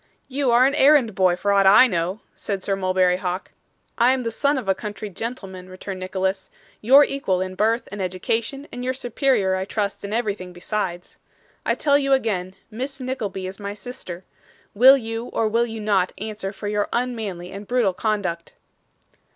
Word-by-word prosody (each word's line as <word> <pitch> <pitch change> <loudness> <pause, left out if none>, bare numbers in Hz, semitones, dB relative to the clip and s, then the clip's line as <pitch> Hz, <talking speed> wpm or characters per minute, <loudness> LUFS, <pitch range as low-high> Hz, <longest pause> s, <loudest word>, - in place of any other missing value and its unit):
'You 275 0 -1
are 240 +2 +6
an 275 - +2
errand 280 -6 +5
boy 185 -2 +3
for 200 +3 0
aught 195 -1 +4
I 205 +6 +8
know,' 185 -2 -1
said 195 -3 -4
Sir 195 - 0
Mulberry 185 -1 +2
Hawk. 185 0 -4 0.5
'I 245 +2 +5
am 260 -1 -2
the 230 - -2
son 280 +5 +1
of 250 -6 -4
a 195 - +4
country 210 +1 -7
gentleman,' 190 -4 -7
returned 185 +1 -7
Nicholas, 190 +1 -2 0.3
'your 270 +6 +7
equal 235 -10 -1
in 185 0 -3
birth 225 +4 +1
and 200 0 -5
education, 225 +9 -2
and 245 - -6
your 255 +1 -1
superior 245 -5 +1
I 190 0 -2
trust 200 0 -3
in 200 - -5
everything 205 -5 -2
besides. 175 -1 -4 0.5
I - - +2
tell 285 -2 +3
you 275 -1 +2
again, 190 -8 0 0.2
Miss 265 +5 -5
Nickleby 230 -8 -4
is 190 +2 -7
my 200 0 -5
sister. 205 -7 -8 0.5
Will 260 +6 +8
you 225 -1 -4
or 225 - 0
will 230 +2 +1
you 225 -1 -6
not 200 -4 +1
answer 210 -2 -5
for 205 0 -7
your 205 0 -1
unmanly 220 -8 -3
and 200 +1 -8
brutal 240 -6 +2
conduct? 185 -5 -2
210 Hz, 185 wpm, -23 LUFS, 190-245 Hz, 0.5 s, I